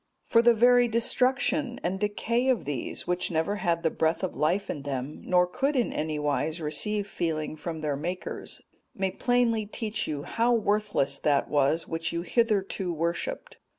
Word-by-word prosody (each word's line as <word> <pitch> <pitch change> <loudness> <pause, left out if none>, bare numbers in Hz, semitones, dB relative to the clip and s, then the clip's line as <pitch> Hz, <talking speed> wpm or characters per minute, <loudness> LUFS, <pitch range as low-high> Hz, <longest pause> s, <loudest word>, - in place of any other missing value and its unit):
For 230 - +4
the 235 0 +5
very 245 +2 +5
destruction 250 +3 +1
and 185 +2 -1
decay 230 +5 0
of 245 -8 +1
these, 140 -3 -4
which 180 0 -1
never 170 +5 0
had 170 -3 0
the 160 - +2
breath 160 +3 0
of 185 - -2
life 180 +6 +1
in 145 - -4
them, 140 0 -4
nor 180 -1 +3
could 270 +11 -1
in 245 -3 +1
any 155 0 -2
wise 150 +2 -1
receive 205 +7 0
feeling 160 -6 -2
from 160 0 -5
their 150 -2 -1
makers, 175 +6 -5 0.3
may 190 -1 -1
plainly 235 -3 +1
teach 215 0 -2
you 145 -2 -3
how 235 +7 +1
worthless 205 -10 0
that 145 -2 +1
was 145 +3 +2
which 165 0 -2
you 170 0 -2
hitherto 195 -4 0
worshipped. 170 - -3
185 Hz, 170 wpm, -27 LUFS, 155-230 Hz, 0.3 s, the